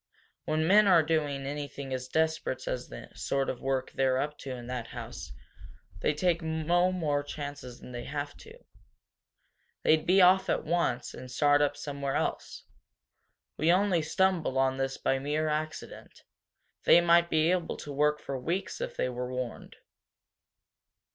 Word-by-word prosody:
When 155 +1 0
men 205 +4 +6
are 175 -4 +6
doing 150 -3 -1
anything 140 -1 -5
as 130 0 -4
desperate 160 -1 -1
as 125 0 -3
the - - -10
sort 135 -1 -1
of 125 - -9
work 135 -1 -1
they're 130 -1 +1
up 150 +3 -2
to 135 - -8
in 125 -2 -6
that 125 -1 -4
house, - - -8 0.7
they 150 - +1
take 170 +2 +1
no 165 +3 +1
more 155 -6 0
chances 145 -4 -7
than - - -11
they 120 -1 -6
have 145 -1 -4
to. 450 +1 -13 1.3
They'd 155 0 +3
be 185 +2 +5
off 185 +1 +5
at - - 0
once, 170 -7 0
and 130 - -9
start 145 +2 +3
up 145 0 +1
somewhere 140 -2 -4
else. - - -3 0.9
We 160 +2 +3
only 185 -2 +3
stumbled 170 -3 +1
on 130 0 +2
this 135 0 -2
by 135 - 0
mere 150 +3 -1
accident 155 +1 -5 0.6
they - - +7
might 170 0 +4
be 160 +2 +3
able 180 -2 -1
to 145 - -7
work 150 +1 +2
for 135 -1 -5
weeks 175 +9 -3
if - - -5
they - - +1
were 125 0 -4
warned." 125 -2 -5
150 Hz, 160 wpm, -29 LUFS, 135-165 Hz, 1.3 s, they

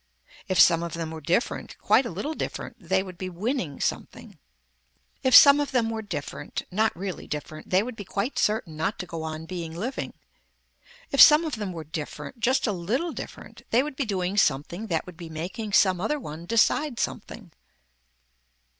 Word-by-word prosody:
If 185 -2 0
some 165 -1 +7
of 170 -1 -4
them 165 -1 -4
were 160 -1 -7
different, 175 +10 -1
quite 255 - +3
a - - -5
little 205 - -4
different 245 -5 -5
they 190 0 0
would 185 -2 -10
be 185 - -4
winning 185 - -3
something. - - -4 0.8
If 260 - +4
some 280 0 +10
of 290 - -1
them 235 -4 +1
were 220 -1 -3
different, 180 -9 -5
not 220 +4 +1
really 190 0 -5
different, 155 +1 -6
they 185 +2 +3
would 250 0 -6
be 205 - -7
quite 200 +7 -2
certain 210 -7 0
not 160 +8 -1
to 180 - -5
go 165 -2 -6
on 160 0 -5
being 165 -2 -6
living. 240 +10 -4 1.0
If 275 - +5
some 305 +2 +9
of 305 -7 -3
them 205 -3 -4
were 165 -2 -6
different, 155 - -7
just 260 +4 +2
a 220 - +1
little 220 - -1
different - - -9
they 240 +3 +3
would 295 -2 -6
be 275 - -1
doing 190 -2 -2
something 170 +6 +1
that 165 -5 -1
would 180 -2 -11
be 170 -2 -8
making 185 +7 -5
some 185 -3 +4
other 300 +8 0
one 165 - -8
decide 235 +4 +2
something. 205 -3 -4
190 Hz, 190 wpm, -26 LUFS, 170-235 Hz, 1.0 s, some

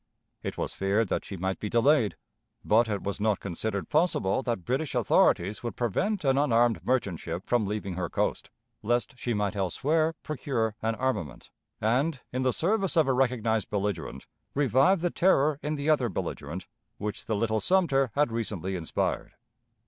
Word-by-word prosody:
It - - -5
was - - -3
feared 100 +2 +1
that - - -1
she 95 - -7
might 95 +2 -2
be 105 - -3
delayed; 120 -1 +3 0.5
but 115 +2 +4
it 100 -2 -2
was 100 +1 -3
not 105 -1 +1
considered 100 +2 -3
possible 150 - +2
that 115 -9 -3
British 135 +3 -1
authorities 105 -4 +3
would 120 - -4
prevent 150 - -1
an 135 0 +3
unarmed 120 -4 +3
merchant 100 -10 0
ship 85 +3 -5
from 120 -4 +1
leaving 105 -2 -3
her 90 -2 -3
coast, - - -1 0.3
lest 120 +5 0
she 120 -2 -2
might 105 0 -1
elsewhere 155 - +1
procure 125 -7 -2
an 115 0 0
armament, 110 - -3 0.3
and, 130 +7 +1
in 130 - -1
the 130 -1 +2
service 195 - 0
of 155 -4 +5
a 135 - +3
recognized 115 -4 +1
belligerent, 95 -10 -3 0.3
revive 140 - +3
the 175 -1 0
terror 150 -5 +3
in 150 +1 -2
the 145 0 -4
other 145 -6 +3
belligerent 85 -1 -5 0.3
which 105 0 -5
the 110 - 0
little 110 +1 +1
Sumter 140 - +3
had 145 -3 +2
recently 100 -5 -3
inspired. 85 -3 -2
115 Hz, 170 wpm, -28 LUFS, 100-140 Hz, 0.5 s, of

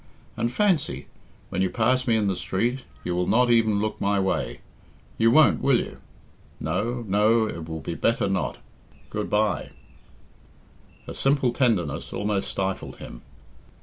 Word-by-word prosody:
And 115 +1 -1
fancy! 190 +2 +1 0.4
when 95 - -2
you 95 - +2
pass 125 +4 +1
me 115 -2 +3
in 105 - +1
the 95 - 0
street, 95 +8 -1 0.2
you 90 - -2
will 90 0 0
not 120 +1 +3
even 110 -3 +3
look 110 +1 -3
my 100 0 +2
way. 95 -10 -1 0.6
You 115 - +5
won't, 155 +6 +5
will 135 -3 +4
you? - - -5 0.6
No 120 +2 -2
no, 110 +3 +3
it 85 -6 -6
will 80 0 -5
be - - -4
better 115 +7 +1
not. 95 -2 -1 0.5
Goodbye!" 105 -2 0 1.4
Her - - -7
simple 135 -3 +1
tenderness 90 - 0
almost 105 -1 -1
stifled 95 -1 -3
him. - - -10
110 Hz, 150 wpm, -25 LUFS, 95-120 Hz, 1.4 s, You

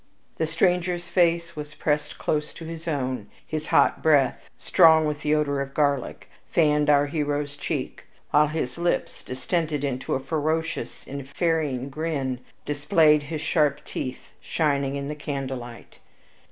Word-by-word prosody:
The 160 - 0
stranger's 175 +1 +1
face 170 -1 +2
was 150 0 -7
pressed 150 -1 -1
close 150 -1 -1
to 165 - -8
his 165 +1 -7
own. 130 -5 -2 0.2
His 155 -1 -4
hot - - +3
breath, 145 -5 +3
strong 160 -3 +5
with 150 -1 -2
the 150 0 +2
odor 140 -2 0
of 140 0 -6
garlic, 140 -4 0 0.2
fanned 150 -2 +3
our 145 -1 +5
hero's 145 -1 -2
cheek, 145 - -4 0.3
while 150 +1 +5
his 155 -1 -3
lips, 175 0 -1
distended 150 +2 -2
into 130 -2 -1
a - - 0
ferocious 160 +4 -2
and 140 -1 -7
ferine 145 -5 0
grin, 140 -4 -2 0.3
displayed 150 +1 +4
his 150 +1 -5
sharp 150 -4 +1
teeth 130 0 -6
shining 140 -3 0
in 140 0 -3
the 150 - -3
candlelight. 135 -5 -6
150 Hz, 145 wpm, -25 LUFS, 140-160 Hz, 0.3 s, strong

